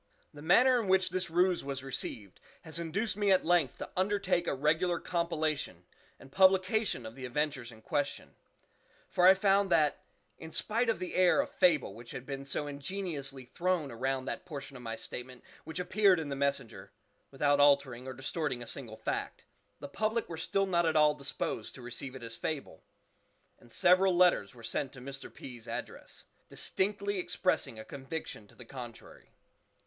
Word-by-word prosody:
The 145 - -11
manner 245 - +5
in 210 - -4
which 190 0 +3
this 185 0 -2
ruse 180 +2 +2
was 135 -1 -4
received 110 -7 -5 0.2
has 160 0 -3
induced 195 +5 -2
me 205 -1 +2
at 190 - +4
length 170 -5 +2
to - - -6
undertake 190 -2 +1
a - - 0
regular 160 +5 +1
compilation 155 - -2 0.3
and 135 - -15
publication 190 - +3
of 110 - -7
the 130 +1 -10
adventures 135 -2 -2
in 110 -1 -15
question; 140 - -2 0.8
for 180 0 +5
I 190 - +9
found 195 0 +3
that, 155 -4 +3 0.4
in 160 - -9
spite 230 +7 0
of 225 - +2
the 185 - -5
air 185 -1 +4
of - - 0
fable 155 - +3
which 115 +2 -12
had 125 - -7
been 140 0 -5
so 145 +1 -2
ingeniously 140 -3 -4
thrown 170 -1 -1
around 130 +2 -2
that - - -4
portion 140 -2 -8
of 125 - -9
my 115 -1 -4
statement 120 +3 -8 0.2
which 160 +2 -6
appeared 190 0 +4
in 155 -3 -4
the 140 - -2
"Messenger" 135 -5 -2 0.4
(without 145 +1 +2
altering 140 -3 +4
or 130 - -4
distorting 135 -1 -3
a - - -10
single 115 -4 -5
fact), - - -4 0.3
the 145 - -7
public 215 +9 -1
were 170 - -6
still 195 +4 0
not 175 -3 +2
at 160 - +1
all 150 -1 +6
disposed 140 -2 -4
to 130 - -11
receive 125 +2 -6
it 130 - -9
as 115 0 -5
fable, 140 - -4 0.8
and 120 - -18
several 185 +5 +4
letters 175 - +4
were 115 - -13
sent 125 +4 -2
to 135 - -10
Mr. 135 +2 -8
P.'s 120 -4 -10
address, - - -7 0.2
distinctly 200 0 -1
expressing 180 -10 0
a 110 - -8
conviction 135 -6 -6
to - - -20
the 125 - -12
contrary. 120 -2 -10
150 Hz, 180 wpm, -31 LUFS, 130-185 Hz, 0.8 s, I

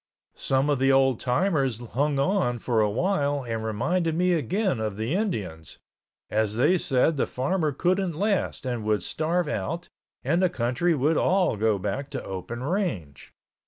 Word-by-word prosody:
Some 135 +1 0
of 140 - +1
the 135 +1 +4
old 135 -3 +3
timers 135 - +1
hung 135 +5 -1
on 140 -4 +1
for 115 -1 0
awhile 145 - 0
and 115 -2 -3
reminded 160 - 0
me 180 +1 +2
again 180 - 0
of 110 -2 -3
the 110 +7 -2
Indians, 105 - -3 0.5
as 110 -1 0
they 175 +10 +3
said 140 +3 +1
the - - +1
farmer 155 +4 -1
couldn't 180 +5 0
last 200 -4 -1
and 120 -3 -2
would 105 -3 0
starve 170 +2 -1
out 150 - -3 0.3
and 165 +7 +1
the 185 - +3
country 135 +4 0
would 150 +3 +2
all 185 - +2
go 105 0 +1
back 105 +8 -3
to 135 -3 -5
open 100 +6 -6
range. 140 - -3
135 Hz, 160 wpm, -26 LUFS, 115-175 Hz, 0.5 s, the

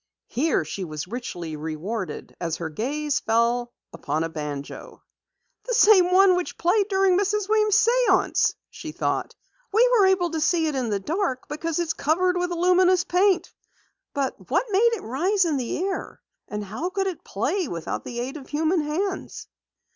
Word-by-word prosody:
Here 270 - +1
she 190 +5 -5
was 155 -1 -6
richly 180 -8 -5
rewarded 160 +7 -5
as 165 -2 -1
her 165 -1 -5
gaze 285 - -2
fell 235 +2 +1 0.2
upon 155 +3 -2
a 165 - -3
banjo. 150 -3 -7 0.6
"The - - -1
same 390 -6 +6
one 375 0 +6
which 360 -1 -3
played 390 +4 +2
during 385 -2 +3
Mrs. 410 0 0
Weems' 425 0 +3 0.2
séance!" 375 0 +2 0.2
she - - -8
thought. - - -2 0.4
"We 455 +5 +5
were 425 -6 +5
able 365 -3 +2
to 320 -1 -2
see 330 0 +2
it 305 - -1
in 255 -4 -1
the 205 -2 0
dark 310 - -2
because 315 +2 -3
it's 340 -2 0
covered 360 +5 +1
with 360 0 -1
luminous 360 +1 +3
paint. 370 +1 +1 0.6
But 275 -2 -3
what - - +2
made 460 +4 +4
it 455 - -4
rise 360 - +1
into 310 -4 0
the 245 - -3
air, 390 -1 -4 0.3
and 210 0 -4
how 220 - -4
could 390 0 -1
it 375 -3 -4
play 380 -5 -1
without 170 -6 -4
the 240 -1 -5
aid 265 +5 -5
of 275 - -12
human 320 +3 +1
hands?" 370 +6 -3
325 Hz, 170 wpm, -24 LUFS, 235-380 Hz, 0.6 s, same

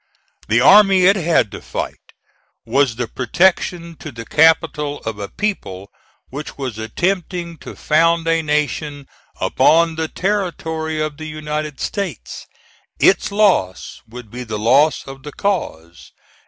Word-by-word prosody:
The 115 +3 +3
army 195 +4 +6
it 195 +2 +6
had 165 - +1
to - - -8
fight - - -5 0.7
was 130 +1 +1
the 120 0 -3
protection 170 +5 0
to 155 - -8
the 115 -2 -9
capital 150 -1 +2
of 110 -2 -5
a 100 - -5
people 100 - -4 0.4
which 145 +2 -7
was 130 -6 -5
attempting 175 - -2
to - - -10
found 165 +1 +2
a 165 0 +2
nation 150 -1 -2 0.3
upon 165 +1 +3
the 160 0 -1
territory 160 -5 -2
of 155 -1 -3
the 155 0 -7
United 150 -1 -5
States. 190 - -5 0.5
Its 200 +2 +3
loss 195 - +1
would 120 -2 -11
be 125 +1 -6
the 110 -3 -5
loss 135 +8 +3
of 135 0 -10
the 150 - -8
cause. 85 - -4
155 Hz, 140 wpm, -19 LUFS, 125-170 Hz, 0.7 s, army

